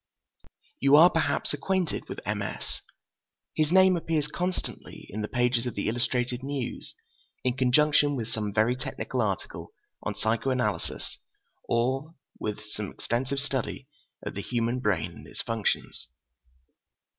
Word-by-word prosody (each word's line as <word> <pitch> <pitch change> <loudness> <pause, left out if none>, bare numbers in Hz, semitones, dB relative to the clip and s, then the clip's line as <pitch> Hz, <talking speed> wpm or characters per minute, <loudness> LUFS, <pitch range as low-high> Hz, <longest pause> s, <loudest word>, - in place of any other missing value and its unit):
You 140 +1 +6
are 170 +4 +9
perhaps 150 -3 +1
acquainted 180 +3 -1
with - - -5
M. - - -1
S. - - -5 0.7
His 155 0 +2
name 190 0 +7
appears 160 -3 0
constantly 180 +4 -4
in 105 - -3
the 105 - -1
pages 125 0 +1
of 120 - -4
the 100 - -1
Illustrated 120 +2 0
News, 135 -2 -4 0.5
in 125 -1 +1
conjunction 145 +3 +4
with 115 -3 -3
some 105 -2 -2
very 110 +4 +3
technical 130 0 -2
article 100 -4 -3 0.3
on 105 - -3
psycho 115 +4 +1
analysis 110 -9 -1 0.5
or 130 +7 +1 0.2
with 105 -1 -3
some 105 -2 -4
extensive 125 +4 -2
study 135 -1 -2 0.4
of - - -3
the 100 - -3
human 120 +2 0
brain 90 -8 +1
and - - -12
its - - -6
functions. 115 -2 -1
125 Hz, 140 wpm, -28 LUFS, 110-145 Hz, 0.7 s, are